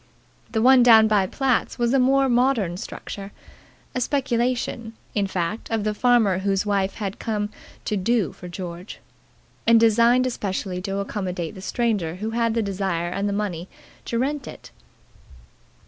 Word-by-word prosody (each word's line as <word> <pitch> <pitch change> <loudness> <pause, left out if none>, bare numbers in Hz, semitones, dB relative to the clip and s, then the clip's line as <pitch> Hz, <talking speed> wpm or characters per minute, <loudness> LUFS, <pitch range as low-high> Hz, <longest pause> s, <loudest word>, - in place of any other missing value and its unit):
The 220 -2 0
one 260 0 +7
down 225 -2 +7
by 205 -3 +2
Platt's 265 +3 0
was 240 +1 +1
a 270 - +4
more 270 +1 +3
modern 240 -7 +2
structure 195 +1 -7 0.6
a 255 - -2
speculation, 245 -4 -1 0.2
in 200 -2 0
fact, 185 +3 -3
of 225 -2 -1
the 215 0 0
farmer 225 -5 +3
whose 195 +1 0
wife 200 -2 0
came 210 +1 -3 0.4
to 210 - -1
"do" 210 -1 0
for 180 - -10
George, 175 +1 -7 0.7
and 230 0 +7
designed 235 +3 +4
especially 190 -6 -3
to 195 +1 -3
accommodate 185 -4 -3
the 190 - -10
stranger 205 -7 -1
who 215 +4 -4
had 230 -1 0
the 230 - +1
desire 190 -4 -2
and 200 +3 -2
the - - -2
money 190 -4 -3 0.4
to 235 - -2
rent 270 +1 -2
it. - - -11
215 Hz, 155 wpm, -23 LUFS, 190-240 Hz, 0.7 s, one